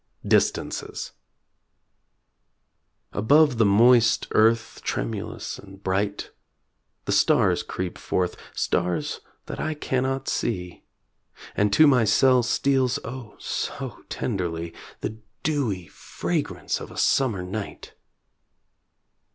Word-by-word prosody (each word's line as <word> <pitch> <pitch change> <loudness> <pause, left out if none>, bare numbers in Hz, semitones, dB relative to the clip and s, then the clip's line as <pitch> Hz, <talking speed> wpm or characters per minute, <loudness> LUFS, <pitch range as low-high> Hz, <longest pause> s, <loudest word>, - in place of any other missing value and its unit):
DISTANCES - - 0 2.0
Above 140 +4 +4
the 110 - +5
moist 115 +3 +5
earth, 110 +1 +2
tremulous 110 -4 -4
and 95 0 -14
bright, 100 +2 -1 0.7
The - - -1
stars - - +3
creep 90 -1 -5
forth 90 -1 -1 0.2
stars 90 -1 -1 0.3
that - - -6
I 155 - -2
cannot 135 -2 -1
see; 90 -6 -3 0.7
And 105 0 +2
to 155 - +7
my 130 -5 +5
cell 125 +4 +5
steals, 130 +1 +1
oh, 120 -3 -8
so - - -4
tenderly 85 -6 -3 0.3
The 110 +1 -4 0.2
dewy 125 - -1
fragrance 75 - -3
of - - -8
a - - -12
summer 115 -9 +2
night! 100 +3 -6
110 Hz, 100 wpm, -25 LUFS, 95-130 Hz, 2.0 s, to